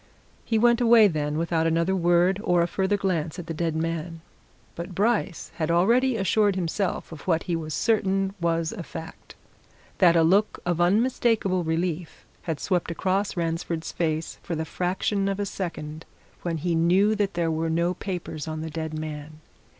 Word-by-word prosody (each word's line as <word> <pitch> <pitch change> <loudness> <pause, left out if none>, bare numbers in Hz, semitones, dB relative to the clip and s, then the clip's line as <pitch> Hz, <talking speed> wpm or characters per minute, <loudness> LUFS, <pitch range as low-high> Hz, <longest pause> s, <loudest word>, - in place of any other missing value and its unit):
He 225 - 0
went 235 +2 +4
away 230 -2 +7
then, 150 -4 -2
without 165 0 +1
another 165 +3 +1
word 175 +2 +3
or 175 -3 +3
a - - 0
further 190 +3 0
glance 170 -5 -1
at 175 - -6
the 165 - -4
dead 165 0 -1
man. 165 0 -3 0.5
But 170 +2 -7
Bryce 210 -4 0
had 155 -1 -1
already 230 +9 +3
assured 200 0 +2
himself 185 +1 -2
of 160 0 -10
what 165 -2 +2
he 175 - -1
was 155 -2 -4
certain 195 -3 +1
was 165 -1 0
a 225 - -6
fact 165 -1 -9 0.6
that 175 -3 +6
a 165 - +5
look 195 +6 +3
of 175 -1 0
unmistakable 210 -1 +2
relief 165 0 -3 0.2
had 160 -4 -3
swept 180 -4 0
across 190 +3 -1
Ransford's 165 -1 -2
face 160 -1 -2
for 170 - -4
the 160 0 -2
fraction 190 +4 -1
of 195 0 -2
a 205 - 0
second 165 -5 -5 0.4
when 170 -2 -2
he 170 +3 -1
knew 180 +6 +3
that 205 -3 -1
there 170 -1 +1
were 160 +1 -1
no 170 +2 +1
papers 175 -5 -5
on 155 0 -4
the 160 0 -5
dead 160 0 -4
man. 155 0 -7
175 Hz, 175 wpm, -25 LUFS, 165-195 Hz, 0.6 s, away